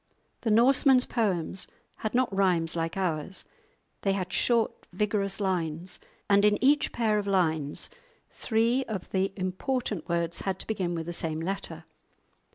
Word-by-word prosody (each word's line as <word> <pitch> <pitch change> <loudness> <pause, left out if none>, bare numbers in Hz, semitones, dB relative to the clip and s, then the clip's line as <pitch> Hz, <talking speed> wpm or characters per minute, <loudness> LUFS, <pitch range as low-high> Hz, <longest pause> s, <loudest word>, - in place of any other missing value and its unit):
The 230 - -1
Norsemen's 255 +3 +5
poems 190 -5 -1 0.3
had 215 +2 -3
not 250 -5 +2
rhymes 175 -4 +2
like 165 +2 -2
ours; 180 -1 -2 0.6
they 195 - +1
had 185 -2 -3
short 235 -2 +1
vigorous 200 +1 -1
lines, 180 -3 -2 0.3
and 200 0 +4
in 210 0 +5
each 290 +3 +3
pair 215 -3 +1
of 200 - -4
lines 160 -7 0 0.4
three 235 +3 +1
of 200 -5 -5
the 190 0 +1
important 190 - -2
words 170 0 0
had 190 -1 -2
to - - 0
begin 185 -5 -2
with 165 -1 -3
the 175 - -4
same 160 -2 -1
letter. 190 +4 -4
195 Hz, 150 wpm, -28 LUFS, 175-220 Hz, 0.6 s, Norsemen's